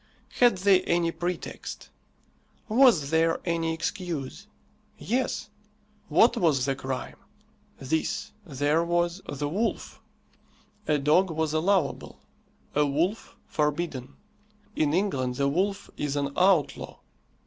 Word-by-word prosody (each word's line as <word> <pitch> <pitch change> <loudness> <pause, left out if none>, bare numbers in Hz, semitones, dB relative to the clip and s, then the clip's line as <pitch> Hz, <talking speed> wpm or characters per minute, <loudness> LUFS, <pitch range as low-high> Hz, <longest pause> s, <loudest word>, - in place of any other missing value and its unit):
Had 245 -5 +5
they 190 0 +4
any 170 -1 +1
pretext? 175 0 -5 0.8
Was 220 - +4
there 165 0 +2
any 165 -1 0
excuse? 165 -4 -4 0.5
Yes. 240 -2 -2 0.6
What 235 +2 +5
was 155 - +2
the 135 -1 0
crime? 130 0 -5 0.6
This: 155 +4 -2
there 145 -1 0
was 175 +2 0
the 145 +1 -3
wolf. 210 +10 -3 0.9
A 150 - +3
dog 155 +7 +3
was 160 -1 -1
allowable; 165 -2 0 0.5
a 150 - +3
wolf 165 +9 -1
forbidden. 150 -3 -2 0.6
In 150 -2 +1
England 145 -9 0
the 140 +2 +1
wolf 195 +7 -1
is 145 -1 -2
an 140 -1 -1
outlaw. 185 -5 +2
165 Hz, 110 wpm, -27 LUFS, 145-185 Hz, 0.9 s, Had